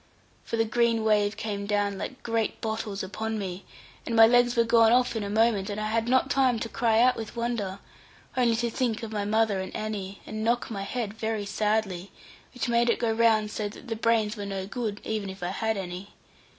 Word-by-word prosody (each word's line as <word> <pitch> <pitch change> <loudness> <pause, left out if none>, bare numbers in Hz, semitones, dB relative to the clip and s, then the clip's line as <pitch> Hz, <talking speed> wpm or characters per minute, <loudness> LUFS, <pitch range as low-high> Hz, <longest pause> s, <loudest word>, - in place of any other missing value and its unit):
For 230 - -3
the 225 - +3
green 230 0 +2
wave 210 -1 +2
came 200 -2 -4
down 205 -1 0
like 260 - -6
great 230 -2 -1
bottles 220 -3 -3
upon 220 +3 -3
me, 190 -2 -5 0.4
and 230 - -3
my 225 0 +9
legs 245 +1 +4
were 235 - +4
gone 230 -1 +5
off 245 0 +3
in 225 - -1
a 200 - -4
moment, 215 -2 +2
and 205 +1 -3
I 215 0 -2
had 225 +1 0
not 260 +1 +3
time 260 -3 +3
to 230 - -2
cry 225 -2 +2
out 250 +2 +5
with 225 +1 -7
wonder, 230 -5 -2 0.6
only 240 -3 +3
to 235 0 -1
think 235 -2 -1
of 225 - -5
my 205 -2 -2
mother 215 -1 +2
and 190 - -6
Annie, 200 -2 -4
and 215 0 -5
knock 235 +1 0
my 200 -3 -4
head 210 +1 -3
very 220 -1 -2
sadly, 205 -3 -1 0.4
which 250 - -3
made 235 0 +3
it - - +3
go 230 -2 0
round 220 -2 +3
so 210 -1 -3
that 225 +1 -7
brains 225 -2 +2
were 205 -2 -5
no 195 -1 -3
good, 215 -1 -4
even 215 -3 -3
if 190 -1 -8
I 175 - -1
had 220 +3 -1
any. 185 +1 -6
220 Hz, 215 wpm, -27 LUFS, 205-230 Hz, 0.6 s, my